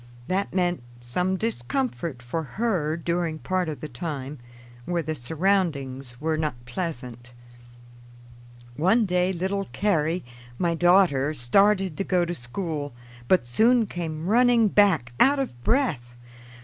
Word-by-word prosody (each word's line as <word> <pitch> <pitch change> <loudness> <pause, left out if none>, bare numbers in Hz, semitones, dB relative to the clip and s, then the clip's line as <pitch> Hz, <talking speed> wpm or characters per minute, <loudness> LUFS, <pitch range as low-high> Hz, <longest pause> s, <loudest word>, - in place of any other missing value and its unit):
That 190 +2 -1
meant 175 -4 0 0.2
some 180 +11 -1
discomfort 180 - -3
for 125 +7 -3
her 165 -3 -1
during 170 -1 -1
part 185 +1 -1
of 150 - -6
the 155 - -4
time, 145 0 -5 0.5
where 175 -1 -1
the 155 +1 -2
surroundings 140 -5 -1
were 155 +1 -1
not 155 -4 -1
pleasant. 120 -4 -6 1.4
One 205 +8 +3
day 180 0 +1
little 190 +2 -2
Carrie, 170 -4 0 0.3
my 170 -2 +1
daughter, 165 -5 +3
started 190 +7 +3
to - - 0
go 180 -2 +1
to 175 - -3
school, 145 0 -5 0.3
but 180 -5 +3
soon 225 - +3
came 165 -4 -5
running 235 +1 +4
back 180 - +3
out 280 +3 +5
of 185 - -4
breath. 145 - 0
170 Hz, 130 wpm, -25 LUFS, 145-195 Hz, 1.4 s, out